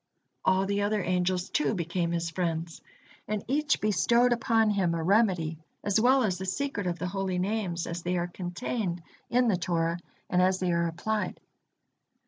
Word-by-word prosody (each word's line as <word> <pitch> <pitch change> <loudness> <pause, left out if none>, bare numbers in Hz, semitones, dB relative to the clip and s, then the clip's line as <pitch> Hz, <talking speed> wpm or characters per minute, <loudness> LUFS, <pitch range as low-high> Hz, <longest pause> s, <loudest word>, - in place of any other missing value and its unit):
All 190 +1 +3
the 200 +1 0
other 205 -1 0
angels, 180 +1 0
too, 300 - +1
became 170 0 -1
his 170 -1 -1
friends, 165 -1 -3 0.5
and 210 -1 -2
each 290 +3 +1
bestowed 235 +4 +3
upon 225 -2 +2
him 185 -5 +1
a 165 - -2
remedy 180 -5 +2 0.2
as 205 +1 +2
well 260 +2 +5
as 185 -5 0
the 190 - -4
secret 205 0 -2
of 175 -1 -1
the 175 - -4
Holy 190 -1 -2
Names, 185 -3 -1
as 170 +1 -4
they 180 +1 -1
are 175 - 0
contained 175 +1 -4 0.3
in 245 0 +3
the 200 -5 +3
Torah, 170 -1 0 0.3
and 180 - +2
as 185 0 +3
they 185 -1 0
are 170 0 +1
applied. 210 +6 -2
185 Hz, 175 wpm, -28 LUFS, 175-215 Hz, 0.5 s, well